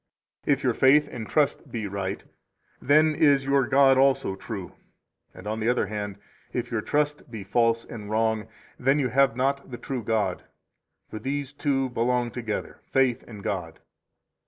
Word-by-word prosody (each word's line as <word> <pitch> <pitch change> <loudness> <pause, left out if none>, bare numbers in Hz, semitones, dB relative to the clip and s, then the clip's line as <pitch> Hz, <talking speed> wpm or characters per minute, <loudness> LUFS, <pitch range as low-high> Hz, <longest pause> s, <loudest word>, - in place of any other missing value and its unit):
3 145 - +4
If 140 - -3
your 125 - +2
faith 145 +5 +5
and 110 -3 -7
trust 150 -2 +1
be 110 -3 -3
right, 100 -1 -4 0.6
then 155 +3 +4
is 145 -3 +3
your 135 -2 +2
god 135 +1 +5
also 135 -8 +2
true; 95 -2 -7 0.6
and, - - -13
on 110 +1 -3
the 110 +2 +1
other 125 - +2
hand, 105 -1 -5 0.4
if 120 0 -3
your 115 -2 0
trust 150 +2 -1
be 110 -4 -7
false 115 +3 +1
and 105 -3 -8
wrong, 110 0 0 0.3
then 135 +3 +3
you 135 -4 +1
have 135 -1 +3
not 140 +2 -1
the 120 - -6
true 130 -1 -4
God; 105 -4 0 0.7
for 110 - -5
these 140 +3 -3
two 135 -2 0
belong 120 0 0
together, 115 -3 -4
faith 130 -3 +2
and 105 -4 -10
God. - - -4
125 Hz, 170 wpm, -26 LUFS, 110-140 Hz, 0.7 s, faith